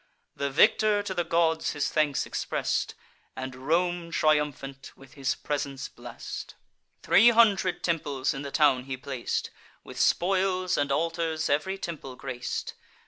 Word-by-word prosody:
The 140 - -1
victor 205 +8 +4
to 195 - -3
the 175 -2 0
gods 165 -1 +1
his 145 -1 -1
thanks 150 -3 +1
express'd, - - -2 0.4
And 130 -1 -5
Rome, 175 +1 +1
triumphant, 150 -4 0
with 135 -1 -16
his 135 -2 -1
presence 140 -2 -4
bless'd. 120 -1 -8 0.5
Three 225 +6 +7
hundred 205 -6 +3
temples 145 -5 0
in 135 - -5
the 140 - -5
town 135 -4 +3
he 135 -1 -4
plac'd; 130 -1 -3 0.3
With - - -9
spoils 185 0 +2
and 145 -1 0
altars 165 +1 0
ev'ry 170 +7 0
temple 155 -8 -6
grac'd. 125 -2 -5
150 Hz, 140 wpm, -27 LUFS, 135-175 Hz, 0.5 s, Three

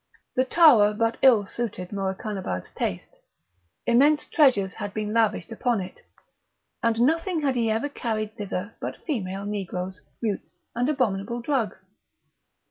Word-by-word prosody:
The 255 - +2
tower 250 -10 +6
but 230 +1 0
ill 235 -6 +6
suited 195 -5 -4
Morakanabad's 190 - -3
taste. - - -4 0.7
Immense 285 +6 +4
treasures 245 - +3
had 205 -2 -6
been 215 0 -2
lavished 225 0 +1
upon 235 0 0
it; 185 -1 -8 0.8
and 230 0 +1
nothing 325 +4 +1
had 275 -2 +2
he 230 -2 +1
ever 225 +5 0
seen 285 - -15
carried 215 -2 -3
thither 205 -1 -4
but - - -6
female 200 - -3
negroes, 190 -4 -4 0.2
mutes, 215 -4 -4 0.2
and 245 +4 +1
abominable 235 -5 0
drugs. 240 -3 -2
225 Hz, 135 wpm, -25 LUFS, 200-250 Hz, 0.8 s, tower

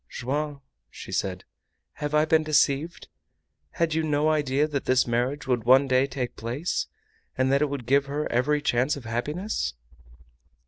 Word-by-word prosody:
"Joam," 145 +3 -3 0.3
she - - -10
said, 95 -2 -2 0.5
"have 150 0 -3
I 150 0 +4
been 160 0 +3
deceived? 155 +1 +1 0.7
Had 165 -2 0
you 160 - +1
no 150 0 +1
idea 150 -1 +1
that 145 -3 -3
this 130 0 +3
marriage 125 +5 -1
would 125 -4 0
one 130 +4 +5
day 130 +1 +3
take 125 -3 -4
place, 125 +10 -3 0.5
and 130 0 +2
that 140 +1 +3
it 150 - +2
would 140 -4 -5
give 140 +3 +2
her 145 +2 -2
every 145 +5 +1
chance 130 0 +1
of 130 - -10
happiness?" 125 - -3
140 Hz, 165 wpm, -26 LUFS, 125-150 Hz, 0.7 s, one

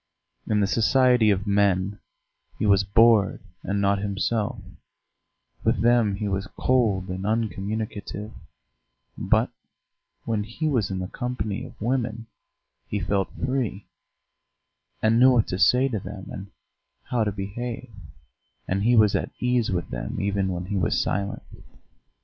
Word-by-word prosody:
In 105 -1 +2
the - - +3
society 120 +2 +4
of 100 -1 +1
men 100 -1 +1 0.6
he - - -1
was 100 -1 +4
bored 110 0 +4 0.2
and 100 +1 -2
not 100 0 +2
himself, 105 +2 -1 1.1
with - - +1
them 115 -4 +3
he 105 +1 -3
was 95 0 -2
cold 105 -7 +1
and 95 +1 -4
uncommunicative; 105 0 -3 0.8
but - - +1 0.7
when 110 -2 -1
he 115 +9 -3
was 120 -10 +1
in 95 - -3
the 90 0 -3
company 110 -3 -4
of - - -14
women 115 -1 -1 0.6
he 105 - -2
felt 100 -1 0 0.2
free, 125 -7 -2 1.2
and 110 +1 +4
knew 130 +1 +7
what 115 -3 +3
to 90 - -3
say 125 +5 +5
to 110 -5 -2
them 95 0 -8
and 95 +1 -7 0.6
how 120 -2 0
to 105 - 0
behave; 115 +5 -5 0.8
and 95 +1 0
he 120 +4 +3
was 105 -3 +5
at - - -1
ease 125 -2 +1
with 90 -2 -2
them - - -4
even 100 -1 0
when 90 -1 -3
he 100 +1 -2
was 90 - +1
silent. 100 0 -2
105 Hz, 145 wpm, -25 LUFS, 100-115 Hz, 1.2 s, knew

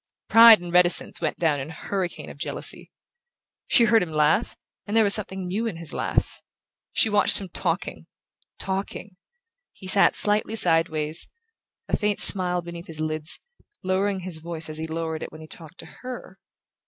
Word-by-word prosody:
Pride 225 -1 +8
and 175 -1 -8
reticence 180 -1 +4
went 155 - -2
down 155 -4 0
in 135 +3 -7
a - - -9
hurricane 185 +3 -5
of - - -15
jealousy. - - -3 0.8
She 240 - +4
heard 225 -1 +4
him 175 -3 -4
laugh, 155 +8 +1 0.3
and 210 +2 -1
there 225 - +5
was 200 -1 +1
something 190 -3 -3
new 205 +6 -3
in 180 - -5
his 165 -2 -3
laugh...She - - -3
watched 205 -1 +4
him 195 -2 -9
talking, - - -4 0.5
talking...He 200 - -9
sat 195 +1 +3
slightly 210 +1 +1
sideways, 165 -5 +2 0.6
a - - 0
faint 210 -1 -1
smile 180 -2 +5
beneath 170 0 -9
his 160 -1 -10
lids, 155 0 -2 0.4
lowering 190 +1 -1
his 175 -3 -4
voice 160 -1 -5
as 155 0 -8
he 160 - -4
lowered 160 0 -4
it - - -7
when 155 - -12
he - - -10
talked 160 +2 -12
to - - -14 0.2
her. 245 -7 -9
180 Hz, 165 wpm, -24 LUFS, 160-205 Hz, 0.8 s, Pride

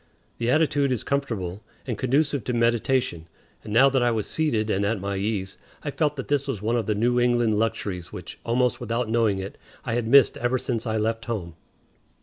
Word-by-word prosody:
The 115 0 0
attitude 145 -1 +2
is 125 - -1
comfortable 110 -9 -2 0.2
and 120 - -2
conducive 140 +1 +1
to 125 - -1
meditation; 115 -6 +1 0.4
and 110 - -8
now 115 +6 +6
that 135 -1 +2
I 120 - +3
was 110 -3 -1
seated 140 -9 0
and 100 - +1
at 105 +1 0
my 100 +1 -3
ease, 100 -1 -2 0.2
I 145 - -3
felt 150 0 0
that 135 - -6
this 145 -1 0
was 135 -7 -2
one 110 +4 0
of 115 -4 -1
the 105 - +1
New 120 +4 +2
England 120 -3 +2
luxuries 105 -6 -2
which, 90 -2 -8
almost 120 0 +1
without 115 0 -2
knowing 110 -3 +2
it, 95 0 -6 0.3
I - - -2
had 120 -1 -1
missed 135 -1 +6
ever 120 +2 +1
since 120 -2 -3
I 110 0 0
left 115 +1 -1
home. 100 -8 -4
115 Hz, 205 wpm, -25 LUFS, 105-130 Hz, 0.4 s, now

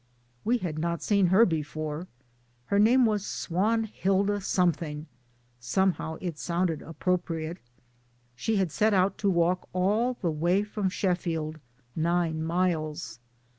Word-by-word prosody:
We 240 +3 +2
had 165 -8 -4
not 170 +1 -2
seen 200 -3 +3
her 190 +6 +6
before; 155 0 -3 0.6
her 200 - +1
name 240 +4 +5
was 210 -3 +1
Swan 210 +6 0
hilda 200 -1 0
Something 165 -5 0 0.5
(somehow 160 +4 0
it 170 -5 -5
sounded 170 -2 -1
appropriate); 165 0 -2 0.8
she 220 - -1
had 190 -5 +1
set 215 +4 +2
out 190 +1 +2
to 200 - +2
walk 175 0 +1
all 210 +7 +1
the 175 -7 -1
way 175 +6 +1
from 210 -2 -2
Sheffield 165 -5 -2 0.4
(nine 165 -1 0
miles). 160 -7 -1
180 Hz, 130 wpm, -28 LUFS, 160-200 Hz, 0.8 s, her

